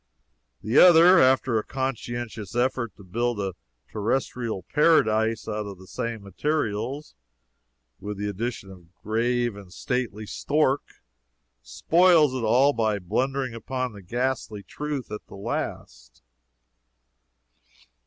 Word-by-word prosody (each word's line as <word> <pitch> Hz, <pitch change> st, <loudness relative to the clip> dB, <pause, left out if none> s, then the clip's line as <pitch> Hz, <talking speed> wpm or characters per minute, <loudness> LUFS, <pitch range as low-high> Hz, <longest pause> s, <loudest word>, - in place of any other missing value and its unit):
The 110 Hz, +5 st, +3 dB
other, 175 Hz, 0 st, +8 dB
after 130 Hz, -3 st, +3 dB
a -, -, -4 dB
conscientious 120 Hz, -5 st, -4 dB
effort 120 Hz, -3 st, 0 dB
to 100 Hz, -, -15 dB
build 115 Hz, +4 st, -2 dB
a 95 Hz, -2 st, -2 dB, 0.4 s
terrestrial 115 Hz, -2 st, -2 dB
paradise 110 Hz, -, +2 dB
out 105 Hz, 0 st, -3 dB
of 100 Hz, -2 st, -8 dB
the 95 Hz, -, -14 dB
same 115 Hz, +2 st, -5 dB
materials, 125 Hz, -, -2 dB, 0.9 s
with 105 Hz, 0 st, -6 dB
the 105 Hz, +1 st, -3 dB
addition 105 Hz, 0 st, -4 dB
of 95 Hz, -, -12 dB
a 85 Hz, 0 st, -27 dB
"grave 120 Hz, +1 st, 0 dB
and 100 Hz, -3 st, -12 dB
stately 110 Hz, 0 st, -3 dB
stork," 145 Hz, +4 st, +1 dB, 0.8 s
spoils 155 Hz, -, +3 dB
it 130 Hz, -, -3 dB
all 130 Hz, +6 st, +4 dB
by 110 Hz, -3 st, 0 dB
blundering 125 Hz, +7 st, -2 dB
upon 125 Hz, +1 st, -4 dB
the 100 Hz, -, -11 dB
ghastly 120 Hz, 0 st, -3 dB
truth 145 Hz, +5 st, -5 dB
at 105 Hz, -, -7 dB
the -, -, -11 dB
last. -, -, -6 dB
115 Hz, 125 wpm, -25 LUFS, 105-130 Hz, 0.9 s, other